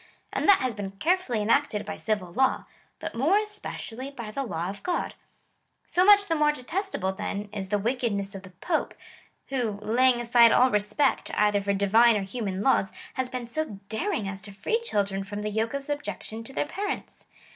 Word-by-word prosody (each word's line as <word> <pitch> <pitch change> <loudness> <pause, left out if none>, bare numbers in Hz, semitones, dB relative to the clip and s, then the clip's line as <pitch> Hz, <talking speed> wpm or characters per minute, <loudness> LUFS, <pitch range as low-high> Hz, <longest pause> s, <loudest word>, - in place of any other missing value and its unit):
And - - +1
that 395 - +7
has 255 -2 0
been 200 -2 -6
carefully 255 - 0
enacted 225 -1 +1
by 160 - -5
civil 205 -5 -2
law, 265 +3 +2 0.3
but - - -6
more 290 - +3
especially 420 - -4
by 235 -6 -7
the 275 - -3
law 175 -10 -3
of 200 +1 -6
God. 360 -1 -2 0.7
So 360 - +2
much 405 +1 +7
the 335 - 0
more 300 -1 +3
detestable, 300 - -2
then, 205 +1 -4
is 195 -2 -4
the 205 - +2
wickedness 215 -3 -1
of 195 - -7
the 185 - -12
Pojje, 305 - -2 0.6
who, 245 -6 -1
laying 240 +4 +3
aside 235 -1 +6
all 255 +1 +5
respect, 210 +7 +1
either 210 -1 +3
for 200 0 0
Divine 215 +4 +5
or 200 - -2
human 195 -2 -3
laws, 230 -7 +3 0.2
has 260 -1 -2
been 250 -1 -4
so 235 -4 -3
daring 275 - -1
as 195 0 -5
to 200 - -9
free 325 - -1
children 200 - -1
from 205 +1 -6
the 210 0 -2
yoke 220 +4 -1
of 280 - -2
sub 290 +1 -3
jection 225 -5 -6
to 270 - -8
their - - 0
parents. 400 +7 -5
230 Hz, 195 wpm, -27 LUFS, 200-280 Hz, 0.7 s, that